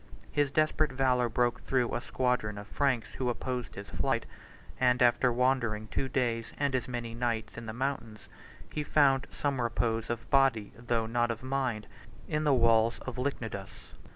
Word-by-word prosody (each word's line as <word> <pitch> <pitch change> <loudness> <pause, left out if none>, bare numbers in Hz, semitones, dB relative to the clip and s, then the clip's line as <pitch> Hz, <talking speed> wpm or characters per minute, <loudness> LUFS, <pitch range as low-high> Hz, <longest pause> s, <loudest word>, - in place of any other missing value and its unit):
His 145 -1 +2
desperate 155 +1 +2
valor 130 -2 +2
broke 120 +1 +1
through 125 -3 0
a - - -1
squadron 125 -5 -1
of 100 - -7
Franks 125 -2 0
who 125 -2 -1
opposed 125 0 -3
his 100 +1 -8
flight; - - 0 0.5
and 125 -1 +3
after 125 +1 +4
wandering 120 -3 +1
two 135 - -2
days 120 -3 -1
and 140 -1 0
as 130 -1 0
many 120 -2 -4
nights 115 -2 -2
in 115 -1 -7
the - - -3
mountains, 125 -4 -4 0.5
he 150 - -1
found 135 -3 +3
some 140 -3 -1
repose, 115 -1 0
of 120 -1 -3
body, 135 -7 +3
though 115 -1 -1
not 120 +1 +1
of 115 +1 -4
mind, 130 -5 -1 0.4
in 150 0 -1
the 145 - +4
walls 115 -1 +4
of 130 -1 -5
Lychnidus. 115 -7 -4
120 Hz, 170 wpm, -30 LUFS, 115-130 Hz, 0.5 s, after